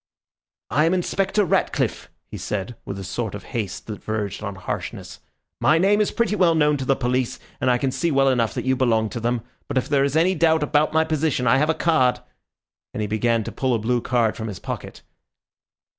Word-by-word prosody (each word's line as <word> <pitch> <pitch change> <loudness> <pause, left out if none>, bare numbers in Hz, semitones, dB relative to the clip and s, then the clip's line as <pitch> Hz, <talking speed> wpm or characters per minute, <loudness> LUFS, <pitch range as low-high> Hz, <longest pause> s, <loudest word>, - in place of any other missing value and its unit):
"I 150 +7 +3
am 170 +3 +2
Inspector 195 +3 +1
Ratcliffe," - - 0 0.2
he - - -10
said, 105 +3 -4
with 100 - -5
a 95 - -6
sort 105 +3 -4
of 100 - -8
haste 105 -5 -4
that 105 -2 -8
verged 105 -2 -3
on 100 -2 -5
harshness. 95 - -6 0.4
"My 155 - +4
name 200 +4 +3
is 210 - +2
pretty 230 -3 0
well 175 -4 +4
known 150 -1 +3
to 135 - -4
the 135 - +3
police, 125 -1 -1 0.2
and 130 - +2
I 125 - +4
can 135 +1 -1
see 170 +5 0
well 135 -2 +3
enough 120 -4 +1
that - - -3
you 130 0 +2
belong 115 -4 +2
to 120 - -5
them. 120 0 -1 0.2
But - - -2
if 130 - +1
there 140 -2 +2
is 140 +1 0
any 175 +4 +4
doubt 160 -2 +3
about 150 +1 +2
my 160 0 +3
position, 155 -5 0
I 125 +2 +5
have 150 +2 +1
a 160 - +2
card," 130 -7 +2 0.8
and - - -2
he - - 0
began 110 +2 +1
to - - -6
pull 130 -2 0
a - - +2
blue 120 +2 0
card 120 -3 +1
from 110 - -5
his 100 -4 -6
pocket. - - -7
130 Hz, 220 wpm, -23 LUFS, 115-160 Hz, 0.8 s, I